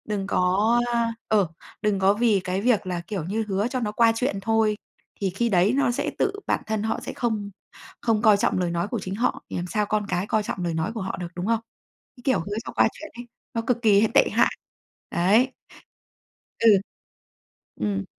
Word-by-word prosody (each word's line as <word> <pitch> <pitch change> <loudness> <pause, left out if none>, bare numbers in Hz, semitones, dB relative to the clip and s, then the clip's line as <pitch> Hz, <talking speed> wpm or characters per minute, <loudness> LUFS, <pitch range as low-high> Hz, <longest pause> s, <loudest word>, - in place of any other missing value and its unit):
Đừng 205 -2 -3
có, 200 +7 +2
a 235 -1 +1
ờ, 205 -4 +3 0.3
đừng 210 -2 +1
có 190 +1 +4
vì 215 -2 +2
cái 185 +1 -2
việc 225 -4 +2
là, 175 -2 -2
kiểu 200 -6 -3
như, 210 +7 -2
hứa 200 +2 0
cho 255 +1 -2
nó 215 -4 -2
qua 230 +1 +4
chuyện 225 -4 -1
thôi, 220 0 +2 0.4
thì 195 - +1
khi 235 +6 -1
đấy 190 +2 +3
nó 275 -3 +2
sẽ 240 - -2
tự 395 - +2 0.2
bản - - 0
thân 220 -1 -1
họ 220 - -1
sẽ - - -5
không 220 -4 -2 0.5
không 225 -3 +1
coi 215 -2 +6
trọng 200 - +1
lời 175 -2 0
nói 170 +2 -1
của 230 +1 -3
chính 190 0 -5
họ, 240 +4 -1
thì - - -5
làm 175 +1 -3
sao 210 +3 0
con 210 0 -1
cái 180 +2 -1
coi 215 -1 +1
trọng 190 -3 -4
lời 170 -1 -1
nói 160 +6 -1
của 225 - -4
họ 190 - -4
được, 175 - -4
đúng 180 +1 -3
không? 230 0 +2 0.6
Cái - - -14
kiểu 260 - +3
hứa 200 +5 -5
cho - - -6
qua - - +4
chuyện 315 - -10
ấy, 240 0 -9 0.3
nó 230 - -1
cực 250 - +2
kỳ 205 -3 +5
h - - +5
tệ - - +6
hại. - - +2 0.6
Đấy. 215 +9 +3 1.1
Ừ. 230 - +6 1.1
Ừm. 100 -2 -1
210 Hz, 220 wpm, -24 LUFS, 190-230 Hz, 1.1 s, coi